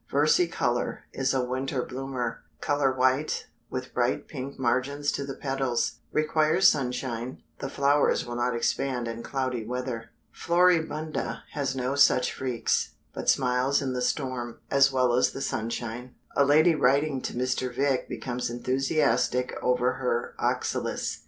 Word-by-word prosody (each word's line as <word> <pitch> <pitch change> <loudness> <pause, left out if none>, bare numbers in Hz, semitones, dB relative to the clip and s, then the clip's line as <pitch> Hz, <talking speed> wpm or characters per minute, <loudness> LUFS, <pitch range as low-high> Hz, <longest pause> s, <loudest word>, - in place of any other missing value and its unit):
Versicolor 145 -4 +1
is 135 -1 0
a 130 -2 +1
winter 130 0 -2
bloomer; 130 -2 -4 0.2
color 145 -2 +1
white, 130 +3 +1 0.2
with - - -5
bright - - 0
pink 135 +2 -6
margins 135 +3 0
to 140 - -3
the 135 -1 -5
petals; 135 -3 -1
requires 155 +3 +3
sunshine; 125 -3 -1 0.2
the 135 - -4
flowers 140 +1 +2
will 120 - -6
not 120 0 0
expand 125 0 -1
in 115 0 -5
cloudy 130 -3 -2
weather. 120 -1 -4 0.2
Floribunda 165 -3 +1
has 140 -3 -2
no 130 +1 -1
such 135 -2 +4
freaks, 125 -3 -1 0.2
but - - -2
smiles 130 +1 +2
in 135 -2 -2
the 125 - -2
storm, 125 -2 -2
as 135 0 +5
well 130 -2 +2
as 125 - +3
the - - -5
sunshine. 120 0 -4 0.2
A 140 - +5
lady 155 +4 +5
writing 140 -1 +2
to - - -4
Mr. 125 0 -1
Vick 135 +1 0
becomes 125 -1 -3
enthusiastic 125 0 +1
over 125 0 +2
her 125 -2 -1
Oxalis. - - -1
130 Hz, 140 wpm, -27 LUFS, 125-140 Hz, 0.2 s, as